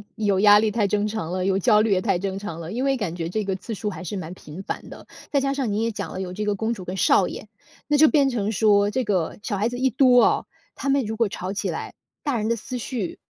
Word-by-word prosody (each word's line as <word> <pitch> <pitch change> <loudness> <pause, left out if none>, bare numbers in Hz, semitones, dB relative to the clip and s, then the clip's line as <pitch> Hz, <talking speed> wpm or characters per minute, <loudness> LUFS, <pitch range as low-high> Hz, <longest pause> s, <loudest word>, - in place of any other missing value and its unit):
有 205 -3 +1
压 205 0 +8
力 220 - +2
太 215 0 0
正 205 +1 +1
常 205 -6 -4
了， 185 0 -1
有 195 -1 +2
焦 210 +2 +4
虑 215 0 +2
也 185 - +1
太 195 -3 +1
正 195 0 -3
常 185 -5 -6
了。 170 +3 -6
因 250 +3 -2
为 275 -1 +2
感 180 -7 -3
觉 165 -1 -3
这 210 +2 -2
个 190 -1 -1
次 210 +4 -7
数 210 0 -3
还 180 -2 -7
是 195 +3 -4
蛮 180 -1 -6
频 165 +1 -10
繁 - - -6
的， - - -12 0.2
再 280 - +3
加 275 0 0
上 265 -6 -1
您 210 +2 0
也 230 - +1
讲 200 -5 -5
了 - - -6
有 185 -1 -4
这 210 +2 -3
个 210 0 +1
公 220 +3 -1
主 195 -5 -8
跟 180 +2 -5
少 190 0 +4
爷， - - -8 0.4
那 295 - +2
就 310 +1 +7
变 280 -3 +3
成 220 -4 -1
说 205 -1 +3
这 255 +1 -1
个 185 -6 -1
小 205 -1 -3
孩 215 +4 +1
子 245 - -5
一 265 0 +3
多 250 0 +5
哦， - - +1 0.3
他 275 - -3
们 275 -3 +2
如 220 +1 -3
果 230 -2 +1
吵 190 0 -5
起 205 - -2
来， - - -5 0.3
大 285 -3 0
人 215 +1 -1
的 235 - +1
思 250 +3 -6
绪， 225 -6 -4
210 Hz, 310 characters per minute, -24 LUFS, 190-235 Hz, 0.4 s, 压